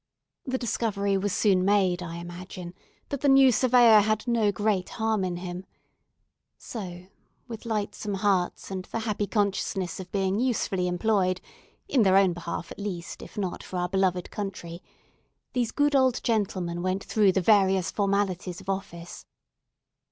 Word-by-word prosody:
The 260 Hz, -2 st, -1 dB
discovery 210 Hz, -4 st, -1 dB
was 195 Hz, +1 st, 0 dB
soon 190 Hz, -2 st, +3 dB
made, 190 Hz, -2 st, +2 dB
I 170 Hz, -1 st, -6 dB
imagine, 175 Hz, +1 st, -8 dB, 0.4 s
that 280 Hz, -2 st, -4 dB
the 285 Hz, -, +3 dB
new 270 Hz, -1 st, +7 dB
Surveyor 240 Hz, -3 st, +6 dB
had 215 Hz, +2 st, 0 dB
no 225 Hz, -3 st, +2 dB
great 205 Hz, -2 st, 0 dB
harm 220 Hz, -2 st, +1 dB
in 180 Hz, -1 st, -2 dB
him. 180 Hz, 0 st, -6 dB, 0.9 s
So, 180 Hz, -5 st, -7 dB, 0.4 s
with 230 Hz, -1 st, -8 dB
lightsome 210 Hz, -1 st, -2 dB
hearts 195 Hz, -2 st, 0 dB
and 185 Hz, -1 st, -4 dB
the 225 Hz, -, -4 dB
happy 210 Hz, -2 st, -2 dB
consciousness 195 Hz, -4 st, -1 dB
of 185 Hz, -1 st, -9 dB
being 195 Hz, 0 st, 0 dB
usefully 225 Hz, -7 st, 0 dB
employed—in 185 Hz, +6 st, -1 dB
their 190 Hz, -2 st, +5 dB
own 195 Hz, -2 st, +4 dB
behalf 170 Hz, 0 st, -6 dB
at -, -, -9 dB
least, 185 Hz, -4 st, -5 dB
if -, -, -12 dB
not 190 Hz, -4 st, -3 dB
for 185 Hz, -, -6 dB
our 180 Hz, 0 st, -1 dB
beloved 185 Hz, -2 st, 0 dB
country—these 195 Hz, +5 st, -7 dB
good 290 Hz, 0 st, +2 dB
old 260 Hz, -2 st, +3 dB
gentlemen 185 Hz, -6 st, -1 dB
went 185 Hz, +2 st, -1 dB
through 205 Hz, -3 st, +3 dB
the 190 Hz, -, +2 dB
various 190 Hz, -2 st, +3 dB
formalities 195 Hz, -3 st, -1 dB
of 195 Hz, 0 st, -10 dB
office. 175 Hz, -3 st, -5 dB
195 Hz, 150 wpm, -27 LUFS, 180-215 Hz, 0.9 s, new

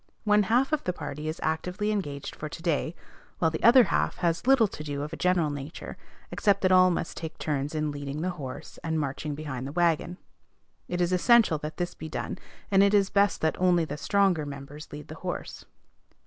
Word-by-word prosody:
One 210 Hz, -1 st, +4 dB
half 245 Hz, +8 st, +2 dB
of 310 Hz, -, +1 dB
the 180 Hz, -, -1 dB
party 150 Hz, -2 st, -6 dB
is 155 Hz, -, -4 dB
actively 180 Hz, +6 st, -1 dB
engaged 145 Hz, -9 st, -4 dB
for 150 Hz, -, -6 dB
to 165 Hz, -, -9 dB
day, 165 Hz, 0 st, 0 dB, 0.4 s
while 160 Hz, -2 st, +2 dB
the 160 Hz, -, -4 dB
other 245 Hz, +2 st, +8 dB
half -, -, 0 dB
has 170 Hz, +5 st, -1 dB
little 265 Hz, -5 st, +6 dB
to 150 Hz, -, -8 dB
do 145 Hz, -1 st, -3 dB
of 150 Hz, +2 st, -6 dB
a -, -, -2 dB
general 180 Hz, -4 st, +1 dB
nature, 145 Hz, +2 st, -7 dB, 0.4 s
except 200 Hz, -2 st, +2 dB
that 185 Hz, -, +3 dB
all 185 Hz, 0 st, +7 dB
must 170 Hz, -2 st, -2 dB
take 160 Hz, -1 st, -6 dB
turns 145 Hz, 0 st, -2 dB
in 155 Hz, -1 st, -1 dB
leading 145 Hz, +1 st, -5 dB
the 185 Hz, -, 0 dB
horse, 140 Hz, -7 st, -8 dB
and 160 Hz, -1 st, -1 dB
marching 145 Hz, +1 st, -3 dB
behind 140 Hz, -4 st, -5 dB
the -, -, -6 dB
wagon. 170 Hz, +1 st, +1 dB, 0.7 s
It 180 Hz, 0 st, -2 dB
is 175 Hz, +1 st, +1 dB
essential 210 Hz, -3 st, +4 dB
that 150 Hz, +1 st, -6 dB
this 175 Hz, -1 st, -2 dB
be 160 Hz, -, -8 dB
done, -, -, -4 dB, 0.3 s
and 195 Hz, -1 st, +5 dB
it 200 Hz, +1 st, +5 dB
is 200 Hz, -1 st, +3 dB
best 200 Hz, 0 st, +2 dB
that 160 Hz, -, +1 dB
only 175 Hz, -2 st, +4 dB
the 145 Hz, -, -5 dB
stronger 190 Hz, 0 st, +2 dB
members 145 Hz, +1 st, -9 dB
lead 150 Hz, +1 st, -8 dB
the 155 Hz, -, -8 dB
horse. 180 Hz, -1 st, -5 dB
165 Hz, 210 wpm, -27 LUFS, 150-185 Hz, 0.7 s, other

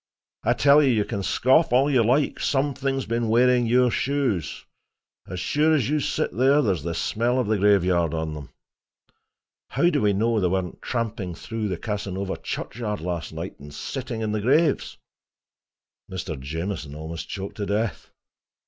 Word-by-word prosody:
I -, -, +3 dB
tell 145 Hz, +1 st, +5 dB
you, 140 Hz, -, +3 dB
you 110 Hz, -4 st, +2 dB
can 100 Hz, -, -3 dB
scoff 130 Hz, -, +3 dB
all 130 Hz, +3 st, +4 dB
you 130 Hz, -5 st, +3 dB
like; 135 Hz, +6 st, +1 dB
something 135 Hz, -1 st, 0 dB
has 135 Hz, -, -3 dB
been 115 Hz, 0 st, -1 dB
wearing 120 Hz, +1 st, +4 dB
your 125 Hz, +1 st, +4 dB
shoes. 130 Hz, -, -1 dB, 0.6 s
As 90 Hz, -, -5 dB
sure 155 Hz, -, +2 dB
as 135 Hz, -6 st, 0 dB
you 150 Hz, -, +2 dB
sit 130 Hz, -, -1 dB
there, 135 Hz, +5 st, +4 dB
there's 95 Hz, -8 st, 0 dB
the 85 Hz, +2 st, -3 dB
smell 120 Hz, +8 st, 0 dB
of 125 Hz, -, +1 dB
the 105 Hz, 0 st, 0 dB
graveyard 90 Hz, -5 st, +3 dB
on 80 Hz, -1 st, -3 dB
them. 75 Hz, -2 st, -8 dB, 1.2 s
How 175 Hz, 0 st, +2 dB
do 145 Hz, -, +1 dB
we 105 Hz, -1 st, +3 dB
know 110 Hz, +3 st, +1 dB
they 90 Hz, -, +2 dB
weren't 90 Hz, -1 st, -2 dB
tramping 115 Hz, -7 st, -3 dB
through 110 Hz, +2 st, -4 dB
the 90 Hz, -3 st, -2 dB
Casanova 100 Hz, -1 st, -3 dB
churchyard 105 Hz, -3 st, -4 dB
last 85 Hz, -3 st, -4 dB
night, -, -, -7 dB
and 75 Hz, +1 st, -11 dB
sitting 120 Hz, -, -5 dB
on 110 Hz, -, -1 dB
the 105 Hz, 0 st, -1 dB
graves!" 145 Hz, +7 st, +2 dB, 1.1 s
Mr. 90 Hz, -3 st, -4 dB
Jamieson 80 Hz, +1 st, -5 dB
almost 80 Hz, +1 st, -7 dB
choked 100 Hz, 0 st, -6 dB
to 100 Hz, -2 st, -3 dB
death. 105 Hz, -3 st, -2 dB
110 Hz, 170 wpm, -24 LUFS, 90-130 Hz, 1.2 s, tell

